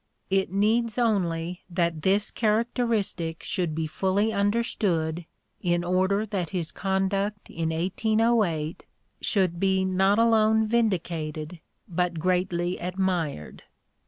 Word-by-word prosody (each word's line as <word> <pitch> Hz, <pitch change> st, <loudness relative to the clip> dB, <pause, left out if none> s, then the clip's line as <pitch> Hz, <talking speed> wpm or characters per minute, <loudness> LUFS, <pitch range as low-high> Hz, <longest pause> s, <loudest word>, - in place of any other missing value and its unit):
It 190 Hz, -2 st, +1 dB
needs 220 Hz, +4 st, +1 dB
only 180 Hz, -7 st, 0 dB
that 170 Hz, -3 st, 0 dB
this 200 Hz, +4 st, +2 dB
characteristic 220 Hz, -7 st, 0 dB
should 175 Hz, -5 st, -2 dB
be 160 Hz, 0 st, -1 dB
fully 190 Hz, +7 st, 0 dB
understood 200 Hz, -6 st, 0 dB, 0.3 s
in 175 Hz, -1 st, +1 dB
order 190 Hz, +4 st, +1 dB
that 195 Hz, -6 st, -3 dB
his 170 Hz, -3 st, -3 dB
conduct 195 Hz, +1 st, -1 dB
in 165 Hz, -1 st, -2 dB
1808 190 Hz, -1 st, 0 dB, 0.4 s
should 185 Hz, -5 st, +1 dB
be 190 Hz, 0 st, +2 dB
not 190 Hz, +2 st, +3 dB
alone 220 Hz, -1 st, +4 dB
vindicated 170 Hz, -8 st, -1 dB, 0.3 s
but 180 Hz, -2 st, -1 dB
greatly 180 Hz, +1 st, 0 dB
admired. 180 Hz, -, -2 dB
190 Hz, 105 wpm, -26 LUFS, 170-210 Hz, 0.4 s, alone